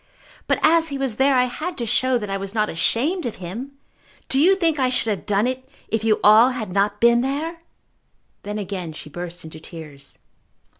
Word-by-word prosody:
But -, -, +2 dB
as 325 Hz, +1 st, +5 dB
he 280 Hz, -3 st, -4 dB
was 265 Hz, -5 st, -2 dB
there 270 Hz, +1 st, +3 dB
I 250 Hz, -, +5 dB
had 310 Hz, +8 st, -4 dB
to 240 Hz, -, -3 dB
show 255 Hz, +3 st, +2 dB
that 210 Hz, -3 st, -5 dB
I -, -, -1 dB
was 195 Hz, +2 st, -6 dB
not 215 Hz, -1 st, +1 dB
ashamed 265 Hz, -, 0 dB
of 230 Hz, -, -5 dB
him! 220 Hz, +11 st, -7 dB, 0.6 s
Do 265 Hz, -, +2 dB
you 365 Hz, +6 st, +5 dB
think 330 Hz, -5 st, 0 dB
I 260 Hz, -1 st, +2 dB
should 240 Hz, -3 st, 0 dB
have 200 Hz, -, -4 dB
done 205 Hz, +1 st, +2 dB
it 260 Hz, +1 st, -4 dB, 0.2 s
if 225 Hz, -1 st, -1 dB
you 220 Hz, -1 st, +2 dB
all 220 Hz, +4 st, +7 dB
had 225 Hz, -7 st, -5 dB
not 200 Hz, +1 st, +1 dB
been 235 Hz, 0 st, +5 dB
there?" 300 Hz, +6 st, -3 dB, 0.8 s
Then 205 Hz, +1 st, -5 dB
again 185 Hz, -5 st, -5 dB
she 150 Hz, 0 st, -10 dB
burst 175 Hz, +2 st, -7 dB
into 160 Hz, 0 st, -10 dB
tears. 155 Hz, -4 st, -11 dB
230 Hz, 205 wpm, -22 LUFS, 195-270 Hz, 0.8 s, all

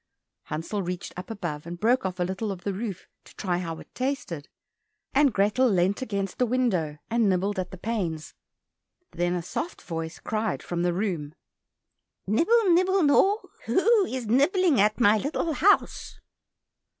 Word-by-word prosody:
Hansel 165 Hz, +7 st, -3 dB
reached 180 Hz, -1 st, -5 dB
up 180 Hz, +4 st, -8 dB
above, 170 Hz, -8 st, -5 dB
and 175 Hz, 0 st, -6 dB
broke 240 Hz, +1 st, +2 dB
off 185 Hz, 0 st, -7 dB
a -, -, +2 dB
little 190 Hz, +4 st, -3 dB
of 185 Hz, -2 st, -7 dB
the 200 Hz, -, -2 dB
roof 200 Hz, -2 st, -5 dB, 0.2 s
to -, -, -18 dB
try 180 Hz, -3 st, -1 dB
how 165 Hz, -2 st, -4 dB
it -, -, -14 dB
tasted, 250 Hz, -, -3 dB, 0.6 s
and 280 Hz, 0 st, +4 dB
Grethel 210 Hz, +6 st, +2 dB
leant 190 Hz, +2 st, +1 dB
against 200 Hz, -6 st, -3 dB
the 250 Hz, -, +3 dB
window 195 Hz, -12 st, 0 dB
and 230 Hz, -3 st, +3 dB
nibbled 190 Hz, +2 st, 0 dB
at 180 Hz, -1 st, -3 dB
the 185 Hz, -, -9 dB
panes. 180 Hz, -7 st, -3 dB, 0.8 s
Then 175 Hz, +1 st, 0 dB
a 175 Hz, -, -3 dB
soft 335 Hz, -, -4 dB
voice 165 Hz, -1 st, -5 dB
cried 220 Hz, 0 st, -2 dB
from 175 Hz, -1 st, -3 dB
the 175 Hz, 0 st, +2 dB
room, 170 Hz, -6 st, -3 dB, 0.9 s
"Nibble, 365 Hz, -, +3 dB
nibble, 370 Hz, +1 st, +3 dB
gnaw, 385 Hz, +9 st, +4 dB, 0.2 s
Who 420 Hz, +1 st, +4 dB
is 255 Hz, -2 st, -4 dB
nibbling 285 Hz, -, +3 dB
at 210 Hz, +3 st, +2 dB
my 215 Hz, -2 st, +5 dB
little 310 Hz, +5 st, -1 dB
house?" 400 Hz, +7 st, +2 dB
205 Hz, 160 wpm, -26 LUFS, 175-260 Hz, 0.9 s, my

